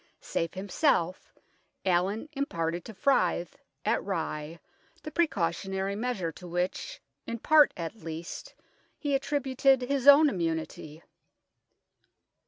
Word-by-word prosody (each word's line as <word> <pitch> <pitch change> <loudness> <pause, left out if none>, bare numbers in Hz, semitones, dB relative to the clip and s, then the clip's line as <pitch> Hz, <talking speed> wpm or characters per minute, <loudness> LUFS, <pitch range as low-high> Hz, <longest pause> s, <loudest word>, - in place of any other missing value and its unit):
Safe 165 +2 -3
himself, 185 - 0 0.5
Allin 190 +7 +1
imparted 170 - -2
to 225 - -8
Fryth, 185 - +1 0.3
at - - +1
Rye, 165 -4 -4 0.4
the 305 - -6
precautionary 195 - 0
measure 210 -7 -2
to 180 +3 -11
which, 180 - -3 0.3
in 230 - -3
part 300 +5 +6
at 165 0 -4
least, 165 -3 -7 0.4
he 290 -2 -2
attributed 270 -1 +2
his 275 +1 -1
own 290 +2 +9
immunity. 160 - -3
190 Hz, 105 wpm, -29 LUFS, 170-270 Hz, 0.5 s, own